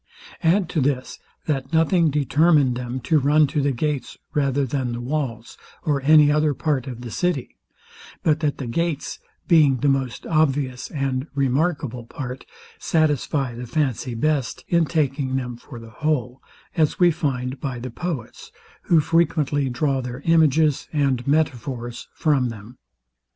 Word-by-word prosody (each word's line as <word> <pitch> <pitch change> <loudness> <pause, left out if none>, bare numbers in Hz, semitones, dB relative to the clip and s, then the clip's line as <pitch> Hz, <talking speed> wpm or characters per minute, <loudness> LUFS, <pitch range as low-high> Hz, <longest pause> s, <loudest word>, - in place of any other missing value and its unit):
Add 175 +2 +3
to 160 - 0
this, 130 -1 -1 0.3
that 135 -2 -2
nothing 165 +1 +3
determined 145 -1 +3
them 125 +1 -4
to 150 +5 +2
run 150 +3 +4
to 145 +1 -1
the 140 0 +1
gates 145 +2 -2 0.2
rather 140 -2 +1
than 130 -2 -2
the 120 - -4
walls, 120 -3 -4 0.2
or 145 -3 0
any 150 +1 +6
other 150 -1 +2
part 140 -4 -1
of 120 -2 -7
the 120 -2 -7
city, 165 - -1 0.7
but 155 -1 +2
that 150 -3 -1
the 135 - -5
gates, 160 +4 -2 0.3
being 150 -6 +5
the 145 - 0
most 135 -4 -1
obvious 140 -5 0
and 135 -1 -2
remarkable 140 -2 0
part, 130 -1 -7 0.3
satisfy 145 -4 0
the 120 +1 -7
fancy 130 -2 -1
best 140 0 -1
in 170 -1 +3
taking 140 -4 -1
them 125 -2 -3
for 125 +1 -12
the 115 -1 -11
whole; 130 -2 -2 0.3
as 155 -3 +2
we 175 -1 +6
find 135 -5 -2
by 135 -3 -4
the 125 +1 -6
poets, 155 -4 -6 0.3
who 165 -3 +4
frequently 150 -4 +1
draw 135 +2 0
their 125 +1 -6
images 155 -2 +3
and 140 -4 0
metaphors 125 -5 -1
from 140 -5 +2
them. 115 +2 -11
140 Hz, 150 wpm, -23 LUFS, 125-155 Hz, 0.7 s, any